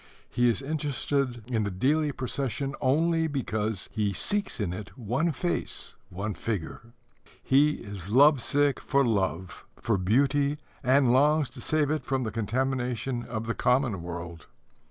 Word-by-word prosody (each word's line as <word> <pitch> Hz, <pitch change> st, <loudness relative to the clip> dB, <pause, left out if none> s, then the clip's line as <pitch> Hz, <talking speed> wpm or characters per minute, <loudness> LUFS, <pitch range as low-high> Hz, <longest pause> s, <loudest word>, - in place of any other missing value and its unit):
He 120 Hz, 0 st, +3 dB
is 120 Hz, +4 st, -1 dB
interested 140 Hz, -4 st, -1 dB
in 115 Hz, -3 st, -1 dB
the 100 Hz, -, -1 dB
daily 145 Hz, +10 st, +1 dB
procession 135 Hz, 0 st, -3 dB
only 160 Hz, +4 st, +2 dB
because 110 Hz, -, -2 dB
he 105 Hz, -2 st, 0 dB
seeks 205 Hz, -, -1 dB
in 95 Hz, -5 st, -1 dB
it 105 Hz, +6 st, -8 dB
one 125 Hz, +8 st, 0 dB
face, 175 Hz, +4 st, -2 dB, 0.2 s
one 100 Hz, +4 st, -4 dB
figure. 100 Hz, -8 st, -4 dB, 0.6 s
He 145 Hz, +3 st, +4 dB
is 100 Hz, -6 st, -8 dB
love 140 Hz, +4 st, +6 dB
sick 145 Hz, +3 st, +2 dB
for 140 Hz, -1 st, +2 dB
love, 95 Hz, -5 st, -1 dB
for 110 Hz, -4 st, 0 dB
beauty, 140 Hz, +8 st, +2 dB, 0.3 s
and 130 Hz, -1 st, +4 dB
longs 145 Hz, 0 st, +3 dB
to 125 Hz, -1 st, -10 dB
save 150 Hz, 0 st, +1 dB
it 155 Hz, -3 st, -1 dB
from 130 Hz, +1 st, -1 dB
the 110 Hz, -, -3 dB
contamination 125 Hz, +2 st, -1 dB
of 115 Hz, -2 st, -5 dB
the 115 Hz, -, -1 dB
common 125 Hz, -7 st, +1 dB
world. 85 Hz, -2 st, -7 dB
125 Hz, 150 wpm, -27 LUFS, 105-140 Hz, 0.6 s, love